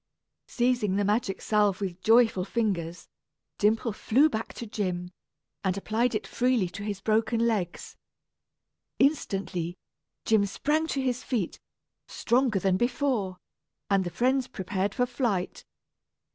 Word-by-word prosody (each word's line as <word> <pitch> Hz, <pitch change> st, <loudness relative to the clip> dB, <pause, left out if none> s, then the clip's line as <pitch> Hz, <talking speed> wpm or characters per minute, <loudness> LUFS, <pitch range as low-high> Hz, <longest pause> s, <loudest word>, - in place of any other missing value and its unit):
Seizing 240 Hz, -5 st, +1 dB
the 205 Hz, 0 st, +1 dB
magic 205 Hz, -1 st, 0 dB
salve 210 Hz, -3 st, +2 dB
with 185 Hz, -3 st, -4 dB
joyful 225 Hz, -4 st, +4 dB
fingers, 180 Hz, -6 st, -2 dB, 0.5 s
Dimple 220 Hz, +2 st, +2 dB
flew 270 Hz, +9 st, +3 dB
back 220 Hz, +1 st, -3 dB
to 235 Hz, -, -6 dB
Jim, 180 Hz, -4 st, -3 dB, 0.5 s
and 190 Hz, -1 st, 0 dB
applied 225 Hz, +4 st, 0 dB
it 215 Hz, -, -2 dB
freely 250 Hz, -6 st, +1 dB
to 175 Hz, +3 st, -8 dB
his 205 Hz, -1 st, -3 dB
broken 225 Hz, +2 st, +1 dB
legs. 205 Hz, -7 st, -2 dB, 1.0 s
Instantly, 195 Hz, -, 0 dB, 0.5 s
Jim 215 Hz, -2 st, +3 dB
sprang 305 Hz, +10 st, 0 dB
to 275 Hz, -, -1 dB
his 250 Hz, -1 st, -1 dB
feet, 220 Hz, -9 st, -2 dB, 0.5 s
stronger 245 Hz, -3 st, +1 dB
than 190 Hz, 0 st, +2 dB
before, 240 Hz, -5 st, 0 dB, 0.5 s
and 195 Hz, -1 st, +4 dB
the 175 Hz, -, -3 dB
friends 255 Hz, +6 st, +1 dB
prepared 195 Hz, -3 st, -3 dB
for 250 Hz, -, +2 dB
flight. 240 Hz, -7 st, -2 dB
215 Hz, 130 wpm, -27 LUFS, 190-245 Hz, 1.0 s, joyful